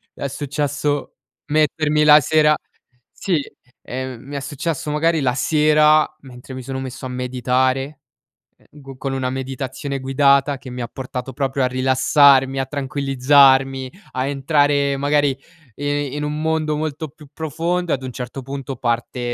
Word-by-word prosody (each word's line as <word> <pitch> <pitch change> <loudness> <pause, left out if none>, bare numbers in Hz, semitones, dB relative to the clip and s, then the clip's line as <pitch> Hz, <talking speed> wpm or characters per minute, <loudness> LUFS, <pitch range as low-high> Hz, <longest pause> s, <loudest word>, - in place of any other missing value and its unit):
È 140 - -3
successo 145 +1 -2 0.3
mettermi 150 0 +2
la 150 0 +8
sera 150 +1 +3 0.6
sì, 175 -7 -1 0.4
ehm, 130 -1 -6
mi 140 +2 -9
è - - -1
successo 150 +2 -3
magari 160 +1 +1
la 125 -2 +1
sera 155 +2 +4
mentre 130 -1 -12
mi 130 - -6
sono 130 +1 -5
messo 130 0 -7
a - - -4
meditare, 130 +3 -1 0.6
ehm, - - -28
go 135 -1 -11
con 135 0 -3
una 130 -1 -1
meditazione 135 +1 -4
guidata 140 +1 +3
che 130 - -10
mi 125 0 -6
ha 120 - -3
portato 130 0 -6
proprio 135 0 -1
a 125 - +3
rilassarmi, 135 +1 +4
a 135 - 0
tranquillizzarmi, 135 -1 +3 0.2
a 130 0 -2
entrare 140 0 +1
magari 145 0 +2 0.5
i 145 -1 -2
in 150 - -3
un 150 +1 -3
mondo 160 -1 0
molto 155 0 -3
più 150 0 -16
profondo 165 +3 -2
e - - +4
ad 130 - -10
un 130 - -5
certo 125 +2 -6
punto 135 0 -6
parte, 120 0 -2
140 Hz, 155 wpm, -20 LUFS, 130-150 Hz, 0.6 s, la